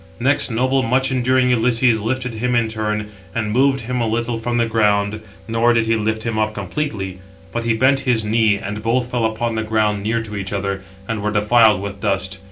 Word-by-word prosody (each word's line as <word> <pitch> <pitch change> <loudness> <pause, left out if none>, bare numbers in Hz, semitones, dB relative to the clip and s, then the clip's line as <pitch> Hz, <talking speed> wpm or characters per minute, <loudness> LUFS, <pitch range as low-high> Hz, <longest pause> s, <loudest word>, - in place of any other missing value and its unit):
Next 135 +4 +1
noble, 130 +3 +1
much 130 +2 +1
enduring 130 0 +2
Ulysses, 120 -1 +2
lifted 125 +2 -2
him 125 +2 -1
in 115 -1 +2
turn, 105 -1 -3 0.2
and 110 -2 -1
moved 135 +3 +2
him 125 +1 -2
a 115 - +1
little 115 +1 -1
from 120 +1 -2
the 120 - +2
ground, 105 -2 +1 0.3
nor 115 +1 +2
did 115 -1 +2
he 115 0 +2
lift 110 0 -1
him 115 -2 -2
up 110 0 0
completely; 100 -11 -4 0.3
but 120 0 -3
he 115 -1 +2
bent 130 +4 +3
his 125 -5 +1
knee; 110 0 +3
and 105 +1 -5
both 120 +2 0
fell 120 -2 0
upon 110 +1 -1
the 110 - -1
ground 110 -1 0
near 110 +2 -1
to 105 -2 -8
each 95 -1 -4
other, 100 -1 -2 0.3
and 110 -2 -3
were 105 - 0
defiled 105 -1 +4
with 100 -1 -6
dust. 95 -2 -1
115 Hz, 210 wpm, -19 LUFS, 105-120 Hz, 0.3 s, defiled